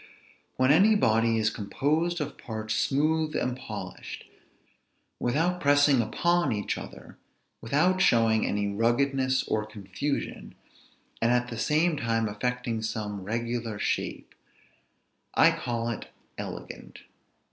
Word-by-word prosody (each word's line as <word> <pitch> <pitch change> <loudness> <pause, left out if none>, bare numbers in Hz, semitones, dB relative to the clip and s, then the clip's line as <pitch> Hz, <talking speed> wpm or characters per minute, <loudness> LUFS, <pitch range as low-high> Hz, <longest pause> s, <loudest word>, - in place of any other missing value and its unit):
When 130 +1 +3
any 200 +8 +6
body 115 - +3
is 110 0 +2
composed 155 +12 -1
of 150 -1 -4
parts 110 -1 -5
smooth 155 +5 +1
and 125 -1 0
polished, - - -8 0.9
without 165 +9 0
pressing 145 -2 +5
upon 170 +7 +1
each 105 -2 -1
other, - - -10 0.4
without 175 +10 +2
showing 115 - +4
any 100 0 0
ruggedness 130 +4 +1
or 110 - -1
confusion, 105 +6 -4 0.7
and 115 +1 +3
at 125 0 +1
the 115 - -6
same 155 +6 +2
time 115 -3 0
affecting 120 +2 -2
some 105 -2 -4
regular 115 +1 -3
shape, - - -3 1.0
I - - +6
call 120 -1 -3
it 115 - -6 0.3
elegant. - - -8
120 Hz, 115 wpm, -27 LUFS, 110-145 Hz, 1.0 s, any